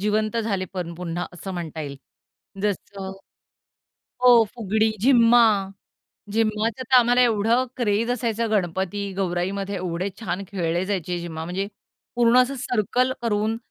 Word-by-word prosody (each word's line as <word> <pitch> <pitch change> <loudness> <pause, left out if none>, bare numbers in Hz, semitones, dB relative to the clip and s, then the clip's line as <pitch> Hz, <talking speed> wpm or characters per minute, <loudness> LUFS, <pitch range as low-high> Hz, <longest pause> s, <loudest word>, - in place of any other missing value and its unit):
जिवंत 215 +2 0
झाले 210 -5 -1
पण 170 -2 -4
पुन्हा 175 0 -4 0.2
अ, - - -2
म्हणता 170 -3 -5
येईल. 140 -2 -6 0.7
जसं, 195 -1 -3 1.1
हो, 245 -2 +7
फुगडी, 220 -1 +1
झिम्मा, 240 -1 +6 0.9
झिम्माच 220 0 +1
तर 260 0 +2
आम्हाला 245 +1 +4
एवढं 230 +1 +3
क्रेझ 230 0 +1
असायचं 230 -2 -1
गणपती 195 0 -1
गौराईमध्ये 195 +2 -2
एवढे 180 +1 -2
छान 185 -2 -3
खेळले 175 -2 -1
जायचे 180 -3 -2
झिम्मा 160 -2 -5
म्हणजे, 185 +4 -3 0.5
पूर्ण 240 +1 +5
असं 275 +2 -3
सर्कल 250 +1 0
करून 220 0 0
205 Hz, 125 wpm, -24 LUFS, 180-230 Hz, 1.1 s, हो